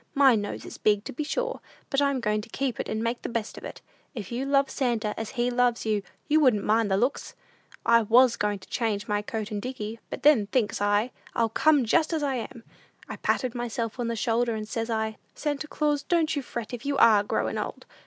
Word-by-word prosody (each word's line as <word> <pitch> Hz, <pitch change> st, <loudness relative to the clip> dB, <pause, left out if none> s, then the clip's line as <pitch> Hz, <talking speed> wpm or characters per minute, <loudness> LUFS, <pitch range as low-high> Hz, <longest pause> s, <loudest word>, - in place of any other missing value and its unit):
My 275 Hz, -2 st, +6 dB
nose 205 Hz, -2 st, -3 dB
is -, -, -9 dB
big, 210 Hz, -1 st, +2 dB
to -, -, -7 dB
be 300 Hz, -, -3 dB
sure, -, -, -2 dB, 0.3 s
but 275 Hz, -, +2 dB
I'm 280 Hz, -2 st, +1 dB
going 210 Hz, -1 st, 0 dB
to 210 Hz, -, -12 dB
keep 265 Hz, +1 st, -2 dB
it -, -, -3 dB
and 220 Hz, +1 st, -2 dB
make 235 Hz, +1 st, -1 dB
the -, -, -4 dB
best 230 Hz, -2 st, -3 dB
of -, -, -10 dB
it! -, -, -8 dB, 0.3 s
If 205 Hz, -4 st, -6 dB
you 255 Hz, +3 st, -2 dB
love 275 Hz, 0 st, +3 dB
Santa 230 Hz, -5 st, 0 dB
as 225 Hz, -1 st, -4 dB
he 240 Hz, +1 st, +1 dB
loves 245 Hz, -1 st, +1 dB
you, 215 Hz, -2 st, +1 dB, 0.3 s
you 305 Hz, +1 st, +4 dB
wouldn't 245 Hz, -9 st, +4 dB
mind 220 Hz, 0 st, +2 dB
the 190 Hz, -, +2 dB
looks. 250 Hz, +6 st, -1 dB, 0.5 s
I 235 Hz, 0 st, +6 dB
was 235 Hz, +3 st, +5 dB
going 205 Hz, 0 st, -1 dB
to 190 Hz, -, -16 dB
change 220 Hz, -3 st, -1 dB
my 205 Hz, 0 st, 0 dB
coat 215 Hz, 0 st, -5 dB
and 205 Hz, -1 st, -3 dB
dickey; 225 Hz, -2 st, -5 dB
but -, -, -6 dB
then, 270 Hz, -9 st, +5 dB
thinks 210 Hz, -3 st, 0 dB
I, 205 Hz, +4 st, +2 dB, 0.2 s
I'll 230 Hz, -1 st, +2 dB
come 290 Hz, +3 st, +3 dB
just 320 Hz, +8 st, +2 dB
as 315 Hz, -2 st, 0 dB
I 280 Hz, -2 st, 0 dB
am! 230 Hz, 0 st, -7 dB, 0.4 s
I -, -, -6 dB
patted 255 Hz, -3 st, 0 dB
myself 240 Hz, -1 st, -3 dB
on 240 Hz, -, -1 dB
the 230 Hz, -, -1 dB
shoulder, 230 Hz, +1 st, +1 dB
and 215 Hz, -1 st, -5 dB
says 225 Hz, +2 st, -3 dB
I, 220 Hz, -1 st, -1 dB, 0.2 s
'Santa 295 Hz, 0 st, -2 dB
Claus, 295 Hz, -1 st, 0 dB
don't 325 Hz, -2 st, +1 dB
you 285 Hz, -, -1 dB
fret 235 Hz, -3 st, -6 dB
if 240 Hz, 0 st, -5 dB
you 280 Hz, -1 st, -1 dB
are 215 Hz, -5 st, +6 dB
growin' -, -, -1 dB
old! -, -, -5 dB
235 Hz, 235 wpm, -27 LUFS, 215-270 Hz, 0.5 s, My